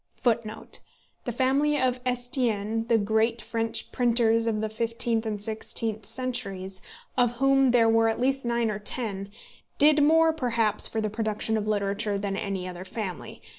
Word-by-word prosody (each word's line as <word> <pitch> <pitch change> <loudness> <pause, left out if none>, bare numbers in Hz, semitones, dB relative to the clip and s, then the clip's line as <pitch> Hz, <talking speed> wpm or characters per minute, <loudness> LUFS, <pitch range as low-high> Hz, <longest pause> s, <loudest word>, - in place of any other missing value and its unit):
[Footnote 225 -3 -2
2: - - -3 0.4
The 245 - -2
family 275 +5 +1
of 255 -1 +1
Estienne, 230 -3 -1
the 230 - +4
great 220 +2 +1
French 225 0 -3
printers 230 -2 +2
of 220 -2 0
the 220 - -1
fifteenth 230 +1 0
and 210 -1 -3
sixteenth 220 0 -2
centuries, 215 -6 -2 0.3
of 245 -2 +2
whom 270 +1 +3
there 240 -2 +4
were 225 0 +4
at 225 - -2
least 270 +2 +1
nine 235 -2 0
or 210 - -4
ten, 205 -2 -2 0.5
did 300 +1 +6
more 320 +2 +4
perhaps 230 -7 +2
for 220 - -2
the 215 -1 -2
production 220 0 -1
of 215 -1 -2
literature 205 0 -1
than 200 -1 -3
any 195 -2 -3
other 180 0 -7
family. 190 -1 -6
225 Hz, 165 wpm, -26 LUFS, 210-245 Hz, 0.5 s, did